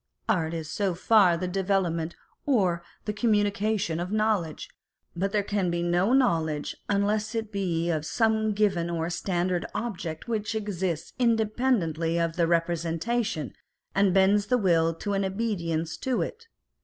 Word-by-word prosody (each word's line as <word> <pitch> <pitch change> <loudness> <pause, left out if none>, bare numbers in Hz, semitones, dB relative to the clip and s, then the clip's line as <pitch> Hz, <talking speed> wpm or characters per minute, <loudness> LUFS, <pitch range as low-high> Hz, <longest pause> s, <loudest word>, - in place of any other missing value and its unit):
Art 170 -7 +1
is 160 -2 -4
so 190 +2 -1
far 185 -2 +4
the 185 +2 -2
development 180 -3 0 0.3
or 190 -11 +2 0.2
the 210 - -2
communi 210 -2 +2
cation 205 -5 -1
of 180 +2 -3
knowledge, 215 -7 0 0.5
but 195 +3 -1
there 210 -1 +1
can 200 -3 0
be 170 0 -1
no 175 +5 +2
knowledge 165 - +1
unless 210 +2 0
it 225 -1 -3
be 175 -4 -1
of 155 -2 -1
some 220 +3 +1
given 195 -5 +1
or 165 0 -2
standard 175 0 -1
object 180 -8 -4
which 220 -1 -2
exists 185 -6 -3
independently 215 - +1
of 165 -1 0
the 170 -2 +2
representation 170 - -1 0.4
and 195 -1 +3
bends 195 +2 +4
the 250 - +3
will 165 -6 +2
to 205 +4 -3
an 195 0 +1
obedience 170 -6 -2
to 260 -2 0
it. 460 0 -8
190 Hz, 150 wpm, -27 LUFS, 170-215 Hz, 0.5 s, far